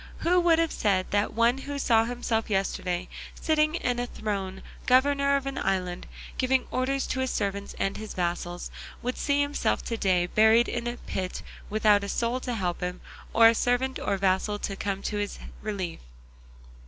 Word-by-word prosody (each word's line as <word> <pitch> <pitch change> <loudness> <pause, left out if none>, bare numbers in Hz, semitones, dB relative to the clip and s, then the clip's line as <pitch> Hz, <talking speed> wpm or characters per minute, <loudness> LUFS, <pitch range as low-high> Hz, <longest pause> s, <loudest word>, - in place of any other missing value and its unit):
Who 360 +2 +4
would 340 -2 +4
have 330 -1 +1
said 190 -3 0
that 205 +1 +1
one 235 +3 +3
who 285 +1 -5
saw 225 -5 +3
himself 235 -2 -1
yesterday 185 -2 -1 0.3
sitting 310 +1 +2
on 245 -1 +1
a 245 - -1
throne, 195 -4 -4 0.2
governor 280 +2 +4
of 275 -1 -1
an 275 0 -3
island, 185 -2 -1 0.3
giving 260 0 +2
orders 265 +2 0
to 260 - -2
his 260 0 0
servants 200 -2 -2
and 195 - -1
his 215 0 -7
vassals, 175 0 -2 0.3
would 250 +1 -1
see 285 0 +1
himself 285 0 0
to 230 - -3
day 185 -4 +2
buried 220 +5 +5
in 240 0 -3
a 240 0 -3
pit 185 -5 -4 0.3
without 210 -1 +4
a 200 - -4
soul 235 +4 0
to 250 -1 -3
help 180 -5 -2
him, 180 0 -3 0.3
or 230 0 +7
servant 245 +3 0
or 200 - 0
vassal 195 +2 +1
to 200 -1 -4
come 195 0 -3
to 210 - -2
his 205 0 -3 0.2
relief? 195 -5 -4
220 Hz, 180 wpm, -27 LUFS, 195-255 Hz, 0.3 s, or